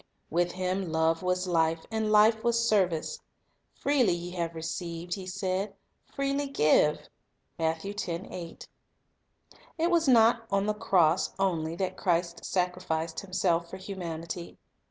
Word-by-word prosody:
With 175 +2 +1
Him 185 -1 -2
love 160 +1 +2
was 180 0 0
life, 165 -2 +1
and 220 -1 0
life 220 +1 +5
was 235 -1 +2
service. 190 - +1 0.6
"Freely 275 -8 +2
ye 175 +1 -5
have 170 -2 -3
received," 170 +1 -4
He 190 -2 -5
said, 190 +1 -2 0.3
"freely 275 +1 -1
give." 150 - +3 0.5
3 165 +5 -2 1.8
It 335 +2 +1
was 335 -3 +3
not 230 -2 +5
on 195 0 +1
the 210 - +1
cross 180 -5 +2
only 165 -4 0
that 185 +1 -3
Christ 170 -2 0
sacrificed 180 -3 -1
Himself 175 -3 0
for 190 - -7
humanity. 170 -3 -6
185 Hz, 125 wpm, -29 LUFS, 165-210 Hz, 1.8 s, life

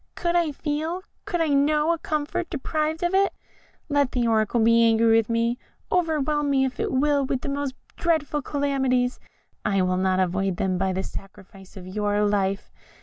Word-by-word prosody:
Could 345 0 -1
I 340 -3 +2
feel, 315 +5 -3 0.2
could 350 - -1
I 320 - +1
know, 300 +3 +3
a 335 - -4
comfort, 305 +3 -2
deprived 310 +2 -2
of 350 +1 0
it? 390 +1 +3 0.5
Let 285 -3 +1
the 245 -2 +1
Oracle 220 +1 +2
be 230 +1 +5
angry 225 0 +4
with 225 -1 +1
me, 230 +1 0 0.3
overwhelm 305 -4 +1
me 270 -1 +3
if 260 -1 -5
it - - -1
will 285 +1 +2
with 265 -1 -2
the - - -4
most 280 -1 -3 0.2
dreadful 310 -3 0
calamities, 265 -3 0 0.4
I 195 -3 +1
will 185 0 +1
not 185 0 +1
avoid 190 0 0
them 185 -1 0
by 190 0 +1
the 190 +1 -2
sacrifice 195 -1 -11
of 180 - -9
your 205 +2 0
life. 200 -1 0
265 Hz, 180 wpm, -24 LUFS, 205-300 Hz, 0.5 s, be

